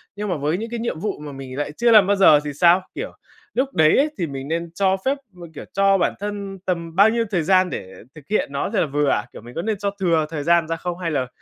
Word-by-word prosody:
Nhưng 205 0 -4
mà 175 - -1
với 150 +4 -1
những 225 +3 -5
cái 235 0 -4
nhiệm 225 -8 -3
vụ 205 -2 -3
mà 150 -1 -8
mình 135 -1 -8
lại 145 0 -2
chưa 235 +10 +2
làm 210 -4 +7
bao 200 - +3
giờ 175 -6 +6
thì 145 -1 -5
sao? 170 +5 +4
Kiểu - - -5 0.4
lúc 265 +2 -1
đấy 155 -1 +4
á, 275 - +4
thì 170 - -2
mình 135 -1 -6
nên 165 +1 -3
cho 190 +2 +1
phép 275 +2 +1 0.2
m 180 -1 -13
kiểu, - - -8
cho 195 0 +3
bản 175 - +1
thân 200 -1 -5
tầm 170 -2 -3
bao 200 +4 +6
nhiêu 230 0 0
thời 175 -5 +1
gian 185 +2 +3
để 95 - -7 0.2
thực 150 -2 -14
hiện 210 -8 0
nó 140 +5 -2
là 205 - +2
vừa 145 0 0
ạ? 105 - 0
Kiểu - - -10
mình 120 +2 -13
có 165 - -2
nên 215 +2 -2
cho 200 +1 -1
thừa 165 -4 +2
thời 155 -3 -4
gian 170 +1 +3
ra 165 - -1
không 175 +1 -5
hay 170 -2 -3
là 135 -4 -1
175 Hz, 285 wpm, -21 LUFS, 150-200 Hz, 0.4 s, làm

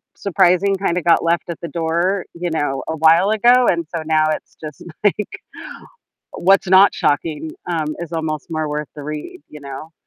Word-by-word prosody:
surprising 195 0 +2
kinda 180 -2 -1
got 170 0 +3
left 170 +1 0
at 170 - -5
the 170 - -4
door, 170 +3 -1
you 175 0 -3
know, 145 -4 -2
a 160 - -2
while 165 +5 +5
ago, 240 +3 +4
and 170 -2 0
so 160 - -3
now 155 -1 +2
it's - - -6
just, 155 -2 -9 0.2
like, 205 0 -1 0.9
what's 195 +1 +2
not 190 +2 +6
shocking, 150 +1 -1 0.2
um, 155 -3 -2
is 170 -1 -6
almost 160 -1 -3
more 155 -1 -2
worth 150 0 -3
the 145 - -8
read, 150 0 -7
you 150 - -11
know? 140 +3 -8
165 Hz, 180 wpm, -19 LUFS, 155-185 Hz, 0.9 s, not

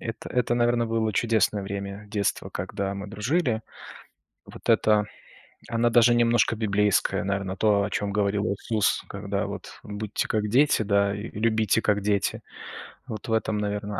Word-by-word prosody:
это 115 -1 -6
это, 120 -1 +1
наверно, 120 -1 +2
было 110 -1 0
чудесное 110 -2 +1
время 100 +1 -6
детства, 100 -2 -1
когда 100 0 -3
мы 100 +1 -6
дружили. 115 - 0 0.8
Вот - - -12
эта, 105 -1 +4 0.7
она 115 +1 +2
даже 120 0 +5
немножко 120 -1 +3
библейская, 105 -3 +1
наверно, 100 -1 -2
то, 105 -1 +3
о 100 - -2
чём 100 +1 -2
говорил 100 0 0
Иисус, 105 0 0
когда 100 0 -3
вот 100 - -8
будьте 105 -1 -3
как 105 -1 -1
дети, 135 0 +4
да, 100 -1 +2
и 105 +3 -6
любите 110 0 +1
как 105 -1 +1
дети. 100 -1 0 0.7
Вот 110 -2 -7
в 110 - -1
этом, 110 -1 0
наверно, 105 0 -3
105 Hz, 155 wpm, -26 LUFS, 100-115 Hz, 0.8 s, даже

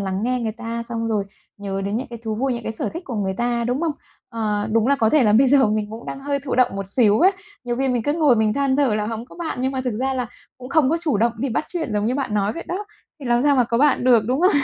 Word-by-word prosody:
lắng 190 0 -2
nghe 250 +1 0
người 225 -2 -2
ta 230 0 -5
xong 230 -1 -3
rồi 210 -3 0 0.3
nhớ 195 -1 -4
đến 200 +2 -1
những 260 - -3
cái 235 - -7
thú 220 -1 -2
vui, 265 +4 0
những 235 - -5
cái 220 - -4
sở - - -2
thích 335 +2 -7
của 250 - -6
người 195 -3 -1
ta, 240 +1 -1
đúng 245 +5 -1
không? 330 -3 0 0.4
Ờ, 215 -2 -2
đúng 225 +1 +3
là 280 0 +3
có 220 -4 +2
thể 305 -4 +4
là 210 - +4
bây 260 +5 +5
giờ 270 -1 +5
mình 210 0 -1
cũng 225 +2 -9
đang 275 - -6
hơi 280 0 -1
thụ 265 - -2
động 250 -5 +2
một 195 -1 -4
xíu 215 +2 +3
á. 375 +3 +6 0.3
Nhiều 240 -1 -2
khi 270 +1 0
mình 245 -2 0
cứ 290 - 0
ngồi 300 -7 +3
mình 220 -1 +2
than 275 0 +1
thở 275 -7 +2
là 210 0 -1
hổng 225 +1 -4
có - - -15
bạn, 330 -6 -4
nhưng 265 +1 0
mà 260 - -2
thực 250 - -1
ra 265 +5 -1
là 250 -2 -2 0.3
cũng 250 0 -9
không 290 -3 +3
có 330 - +2
chủ 305 -10 +1
động 230 +2 +2
đi 270 +3 -1
bắt 235 - -1
chuyện 320 -10 -3
giống 210 0 0
như 245 - 0
bạn 260 -6 -2
nói 205 0 +1
vậy 335 - -7
đó, 395 +4 -3 0.4
thì 265 - -7
làm 240 +1 +2
sao 285 -1 +3
mà 250 - +4
có 235 0 -1
bạn 275 -2 +3
được, 235 -4 +5
đúng 255 +5 0
không? 365 +2 +5
240 Hz, 320 wpm, -22 LUFS, 220-270 Hz, 0.4 s, á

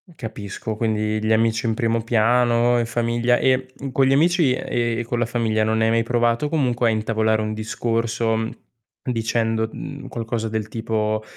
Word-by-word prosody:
Capisco, 110 -1 -6
quindi 110 -1 0
gli 110 +1 +2
amici 115 +1 +1
in 115 - +1
primo 115 0 0
piano, 120 +1 +3
in 115 - 0
famiglia 120 +1 +1
e, 130 0 +1
mhmm, 135 - -5
con 135 +1 +3
gli 135 - +3
amici 165 -2 +3
e 120 -2 -1
con 120 0 -2
la 120 - +2
famiglia 110 -2 0
non 110 0 +1
hai 110 - +3
mai 115 0 +2
provato 120 +3 +1
comunque 125 -6 +1
a - - +3
intavolare 110 0 +1
un 110 0 -2
discorso, 115 +1 -1
mhmm, 115 0 -2 0.6
dicendo, 115 -1 0
mhmm, - - -8
qualcosa 115 -1 -3
del 110 -1 -3
tipo: 110 -1 -1
115 Hz, 175 wpm, -22 LUFS, 110-120 Hz, 0.6 s, piano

